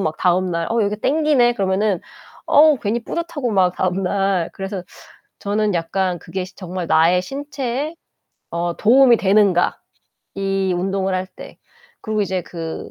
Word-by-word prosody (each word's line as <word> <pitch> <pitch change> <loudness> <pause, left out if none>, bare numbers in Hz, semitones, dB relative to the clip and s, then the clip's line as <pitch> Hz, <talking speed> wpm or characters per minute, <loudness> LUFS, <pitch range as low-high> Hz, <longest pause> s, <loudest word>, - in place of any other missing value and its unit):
막 155 -4 -2
다음날 180 -2 +1
'어 230 -1 +2
여기 205 +1 -1
땡기네.' 285 -3 +3
그러면은 195 -2 0 0.5
어우 300 -2 +5
괜히 225 +3 -2
뿌듯하고 310 -7 -3
막 185 -3 +2
다음날. 190 -1 0
그래서 195 -1 -5 0.6
저는 205 0 0
약간 180 +1 -1
그게 185 +1 -5
시 185 - -16
'정말 180 -2 -5
나의 170 +3 +4
신체에 275 - -4 0.6
어 170 0 -2
도움이 245 +1 +5
되는가 195 -3 +3 0.6
이 195 -1 0
운동을 190 +1 -1
할 185 0 -2
때.' 185 - -13 0.4
그리고 215 -1 -1
이제 190 -2 -2
그 165 -1 -7
195 Hz, 290 characters per minute, -20 LUFS, 180-230 Hz, 0.6 s, 어우